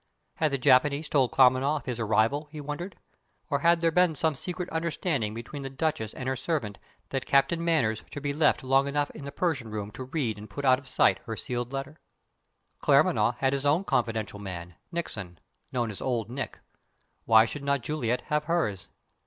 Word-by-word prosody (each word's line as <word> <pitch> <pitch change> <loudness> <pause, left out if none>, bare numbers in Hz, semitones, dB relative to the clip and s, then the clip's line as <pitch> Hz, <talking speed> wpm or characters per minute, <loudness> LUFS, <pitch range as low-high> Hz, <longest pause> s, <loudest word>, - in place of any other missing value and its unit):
Had 155 - +2
the 140 - +1
Japanese 140 +3 +3
told 135 -5 +2
Claremanagh 130 +3 +4
of 145 - -5
his 125 -2 -3
arrival, 115 +7 +1
he 155 - -7
wondered? 150 +6 -5 0.6
Or 140 - +2
had 170 +2 +4
there 165 -1 +3
been 180 -1 +3
some 160 +1 +1
secret 180 +5 -4
understanding 160 - -1
between 120 +5 -7
the 135 - -5
Duchess 135 -6 -2
and 130 - -5
her 130 - 0
servant 125 - -3 0.3
that 135 -1 -3
Captain 165 +5 +3
Manners 130 -11 +1
should 145 - -7
be 145 -1 -1
left 150 -1 +2
long 135 +1 +3
enough 145 +1 0
in 140 - -9
the 140 - -5
Persian 145 -7 -1
room 105 -1 -5
to 130 - -7
read 125 -7 -2
and 105 0 -10
put 140 +6 -5
out 130 -1 +5
of 140 - -16
sight - - +3
her 115 - -3
sealed 120 0 -3
letter? 135 +3 -5 0.8
Claremanagh 120 - +4
had 135 +1 +1
his 140 0 -1
own 150 +6 +3
confidential 110 - -1
man, 90 -3 -7 0.2
Nickson 105 - -4 0.3
(known 120 -3 -1
as 100 - -8
"Old 120 -3 -1
Nick"); 135 -1 -5 0.7
why 110 0 +7
should 140 +4 -6
not 140 -1 +1
Juliet 125 -3 -1
have 150 0 -1
hers? 110 - -1
135 Hz, 195 wpm, -28 LUFS, 115-150 Hz, 0.8 s, why